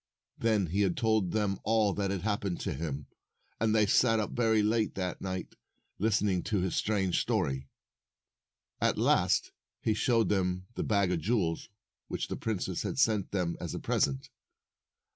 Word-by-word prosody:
Then 110 -4 +2
he 95 +4 +1
told 110 0 +1
them 105 -1 0
all 110 -2 +2
that 100 -1 -1
had 95 -2 -2
hap 105 -1 0
pened 95 -3 -2
to - - -2
him, 70 -1 -4 0.5
and 110 0 +2
they 110 -1 +5
sat 115 +2 +4
up 105 - -2
very 110 -3 +2
late 110 0 +1
that 90 -2 -3
night 95 -1 -4 0.5
listening 100 -3 +2
to 105 - 0
his 90 0 -1
strange 95 -4 +1
story. 65 0 -1 1.1
At - - +2
last - - +2 0.3
he 110 - +1
showed 115 +1 +2
them 90 -2 0
the - - -3
bag 100 -4 +2
of 90 - 0
jewels 85 -2 -1 0.4
which - - -3
the - - -2
princess 95 -5 -2
had - - -3
sent 110 -7 +2
them 90 -4 -1
as - - -4
a - - -3
present. 70 -1 0
100 Hz, 165 wpm, -30 LUFS, 90-110 Hz, 1.1 s, they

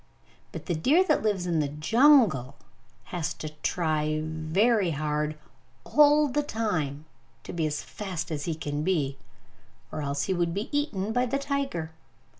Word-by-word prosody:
But - - -8
the 175 - -1
deer 270 - +4
that 375 - +2
lives 205 -4 0
in 170 -2 0
the 150 - +1
jungle 175 - +4 0.6
has 175 -1 -2
to 155 - -6
try 155 -3 0
very 175 +7 +1
hard 150 0 -1 0.5
all 295 0 +5
the 290 +2 0
time 170 - -2 0.4
to - - -8
be 160 -2 0
as 150 -1 -3
fast 180 -5 -5
as 145 -2 -3
he 165 - -2
can 145 -1 -3
be, 150 -6 0 0.7
or - - -4
else 140 -1 -1
he 190 - 0
would 175 -1 0
be 210 +8 -4
eaten 220 -8 -1
by 250 +1 +1
the 275 - 0
tiger! 275 - -2
170 Hz, 160 wpm, -27 LUFS, 155-230 Hz, 0.7 s, all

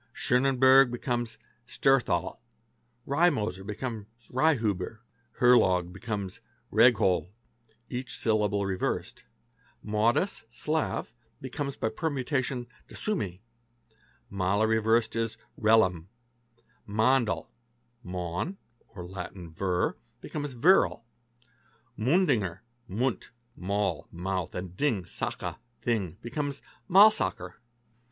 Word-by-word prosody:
Sonnenberg 130 +1 +5
becomes 120 -1 -3 0.3
Sterhthal; 120 -10 +1 0.3
| 120 +1 -39
Reimoser 135 - +1
becomes 105 +1 -5 0.2
Reinhuber; 115 - +1 0.4
Herlog 95 -8 +4
becomes 100 -2 -5 0.3
Rehgol 90 -2 +4 0.6
(each 125 +1 -5
syllable 105 -2 +1
reversed); 95 -1 -3 0.6
Maudis 110 - +1
(Slav) 150 +7 -2 0.3
becomes 140 +1 -4
by 110 - -1
permutation 130 -1 -2 0.2
Daswmi; 100 - -3 0.9
Maller 100 +2 +1
re 110 0 +3
versed 110 +1 +2
is 115 -1 -2 0.2
Rellam; 95 -6 +3 0.8
Mandl— 110 -4 +2 0.6
(Maun=Latin 90 - -6
Vir) 90 +1 0 0.3
becomes 145 -3 -5
Virl; 150 -3 +4 0.9
Mundinger 115 - +1 0.3
(Mund—Maul=mouth 100 - -3
and 90 0 -6
Ding=Sache=thing) 110 - -3
becomes 140 +3 -4 0.3
Maulsacher. 195 - +5
110 Hz, 75 wpm, -28 LUFS, 95-130 Hz, 0.9 s, Sonnenberg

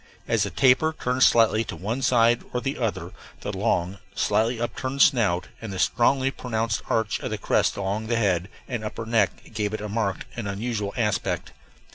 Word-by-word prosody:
As - - +2
the - - +1
tapir 135 +5 +3
turned 125 +1 -1
slightly 115 -2 +5
to - - -6
one 110 +8 -3
side 120 -1 +3
or 125 - 0
the 135 +2 -3
other 115 -4 -2 0.3
the - - -4
long, 90 +3 0 0.2
slightly 110 +4 +1
upturned 130 +3 +1
snout 105 -10 +2
and 115 -3 -6
the 95 - -5
strongly 130 +6 +2
pronounced 115 -4 -2
arch 110 -2 0
of - - -4
the - - -3
crest - - +1
along 100 +3 -2
the 120 0 +1
head 95 -4 +1 0.2
and 120 -4 -4
upper 110 +1 -5
neck 110 -2 0
gave 105 -1 -1
it - - -5
a 105 - -4
marked 105 -2 -2
and 115 -4 -4
unusual 105 0 -2
aspect. 105 -3 -1
115 Hz, 185 wpm, -25 LUFS, 105-120 Hz, 0.3 s, slightly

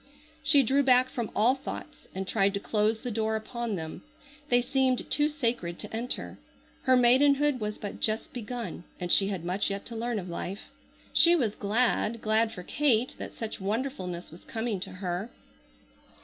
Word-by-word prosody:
She 285 -3 +5
drew 270 +4 +3
back 255 -1 +5
from 235 -5 -3
all 230 +5 +5
thoughts 270 +1 -8
and 190 0 -3
tried 200 -1 +2
to - - -1
close 215 +2 +1
the 245 +2 -5
door 220 0 0
upon 225 0 -3
them. 160 -3 -6 0.5
They 245 - +5
seemed 260 0 +1
too 295 0 +3
sacred 235 - -1
to - - -7
enter. 240 +3 -4 0.5
Her 260 -1 +6
maidenhood 275 +3 +4
was 210 -1 -3
but 205 - -6
just 215 0 -2
begun 235 -6 -5 0.2
and 175 -1 -3
she 195 - +5
had 190 -4 -3
much 185 +4 0
yet 200 0 -4
to 235 - -7
learn 235 0 -2
of 185 -3 -4
life. 180 +3 -6 0.4
She 345 +1 +7
was 235 -10 +1
glad, 225 +2 +1
glad 220 +1 +2
for 180 -5 -8
Kate 255 0 +2
that - - -7
such 220 -3 -5
wonderfulness 195 - -3
was 165 - -13
coming 225 -3 -2
to - - -5
her. 185 +3 -3
225 Hz, 175 wpm, -28 LUFS, 200-250 Hz, 0.5 s, She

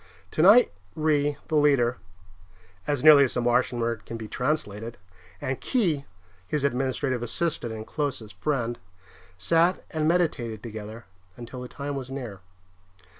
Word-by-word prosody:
Tonight 200 +10 +6 0.2
Ry, 150 -2 +1
the 155 - -1
leader 140 -5 +3 0.9
(as 145 -3 0
nearly 150 -2 +9
as 130 - -3
the 125 - +1
Martian 120 0 +1
word 115 -1 -1
can 115 - -6
be 110 -1 -7
translated), 115 -4 -2 0.4
and 130 0 -3
Khee, 170 - 0 0.4
his 150 +4 -1
administrative 130 -1 0
assistant 120 0 -1
and 110 -1 -6
closest 125 -8 -3
friend, 120 -4 -1 0.6
sat 165 - +2
and 155 -1 0
meditated 125 - 0
together 110 0 -8 0.3
until 120 +1 -8
the 125 - -6
time 140 +2 -5
was 130 -2 -5
near. 125 -8 -6
130 Hz, 135 wpm, -26 LUFS, 115-150 Hz, 0.9 s, nearly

